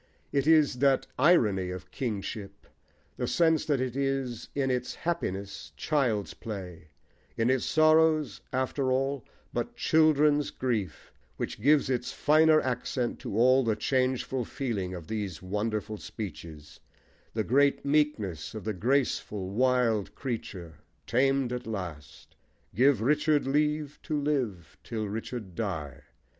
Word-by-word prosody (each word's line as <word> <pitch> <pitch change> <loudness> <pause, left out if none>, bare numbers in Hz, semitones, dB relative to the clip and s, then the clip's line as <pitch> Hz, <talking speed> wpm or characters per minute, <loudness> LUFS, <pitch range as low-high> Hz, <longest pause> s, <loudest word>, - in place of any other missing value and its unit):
It 140 +1 +1
is 155 -5 +4
that 135 -1 +3
irony 110 - +4
of 90 0 -7
kingship, 105 -5 -5 0.5
the - - -2
sense 160 -2 +2
that 145 -4 +1
it 130 -1 -2
is 135 -4 -2
in 135 -2 +1
its 125 0 -2
happiness 100 - -4
child's 120 - 0
play, 90 -7 -8 0.5
in 115 +3 +2
its 130 -1 +1
sorrows, 155 -6 +3
after 130 +1 0
all, 135 0 0 0.3
but - - -3
children's 150 -2 +3
grief, 110 -10 -3 0.2
which - - -4
gives 145 +3 +4
its 125 -2 -1
finer 155 +1 +4
accent 125 -1 -2
to 100 - -5
all 130 +3 +5
the 110 -3 +1
changeful 130 +2 0
feeling 105 -8 -3
of 85 -3 -8
these 100 -4 -4
wonderful 105 +2 -2
speeches: 80 -9 -8 0.6
the 110 - +1
great 140 +6 +2
meekness 140 - 0
of 110 - -6
the 110 - -2
graceful, 105 -3 0
wild 120 -2 +1
creature, 95 - -6 0.3
tamed 135 +1 +2
at 125 -1 -5
last. 85 -10 -7 0.4
Give 130 +1 +4
Richard 150 +3 +2
leave 150 +1 0
to 150 -1 -2
live 125 - -2
till 110 -3 -3
Richard 110 -1 -5
die! 80 - -4
125 Hz, 130 wpm, -28 LUFS, 100-140 Hz, 0.6 s, all